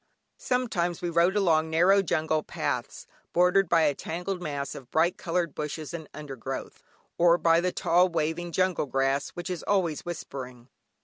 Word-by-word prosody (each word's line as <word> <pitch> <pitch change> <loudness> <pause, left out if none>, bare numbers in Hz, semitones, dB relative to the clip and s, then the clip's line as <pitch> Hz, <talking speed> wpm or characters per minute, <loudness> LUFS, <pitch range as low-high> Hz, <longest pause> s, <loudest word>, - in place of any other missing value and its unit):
Sometimes 185 -10 -1
we 175 - -1
rode 170 +3 +3
along 160 -6 +3
narrow 180 +5 +4
jungle 155 -3 0
paths, - - -4 0.3
bordered 180 +1 +4
by 165 -1 +4
a 150 -2 +3
tangled 180 +6 -4
mass 145 -4 -4
of 130 -2 -10
bright 165 +3 +2
coloured 170 -2 -2
bushes 150 +1 -5
and 160 -3 -7
undergrowth, 140 -6 -7 0.4
or 170 0 +6
by 165 0 +4
the 180 +1 0
tall, 180 +2 +3
waving, 165 +1 -2
jungle 185 -3 +1
grass, 135 +1 0
which 175 +1 -5
is 180 - -4
always 180 -7 0
whispering. 130 -7 -7
170 Hz, 160 wpm, -27 LUFS, 150-180 Hz, 0.4 s, or